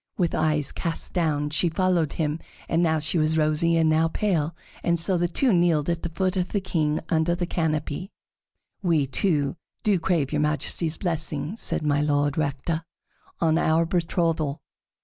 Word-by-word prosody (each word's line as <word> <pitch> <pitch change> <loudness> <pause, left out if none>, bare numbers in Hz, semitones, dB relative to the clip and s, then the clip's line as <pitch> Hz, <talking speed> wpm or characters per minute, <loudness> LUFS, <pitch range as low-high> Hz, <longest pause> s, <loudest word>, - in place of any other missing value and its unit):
With 175 -3 0
eyes 155 -2 +1
cast 165 -2 -2
down 150 -4 0
she 170 +3 +2
followed 175 -3 +1
him, 155 0 -1 0.3
and 165 - +1
now 160 -2 +2
she 155 +2 0
was 155 +1 +1
rosy 155 +2 +2
and 160 -1 +3
now 160 +1 +3
pale, 165 -4 -1 0.3
and 170 0 +1
so 180 +3 +4
the 175 0 +1
two 235 +7 +1
kneeled 170 -3 +2
at 170 0 -3
the 170 - -3
feet 185 +3 -1
of 180 -1 -1
the 205 - +2
king 155 -5 0
under 165 +1 +2
the 175 0 -2
canopy. 160 +1 -2 0.7
"We 165 -6 +2
two 145 +1 0 0.3
do 205 -4 +2
crave 165 -5 0
your 150 -1 0
Majesty's 155 +2 +1
blessing," 160 -1 -2
said 225 - -2
My 145 -1 +2
Lord 145 -1 +1
Rector, 155 +2 -2 0.6
"on 165 -1 +2
our 160 +1 +2
betrothal." 165 -4 -1
160 Hz, 170 wpm, -25 LUFS, 150-175 Hz, 0.7 s, so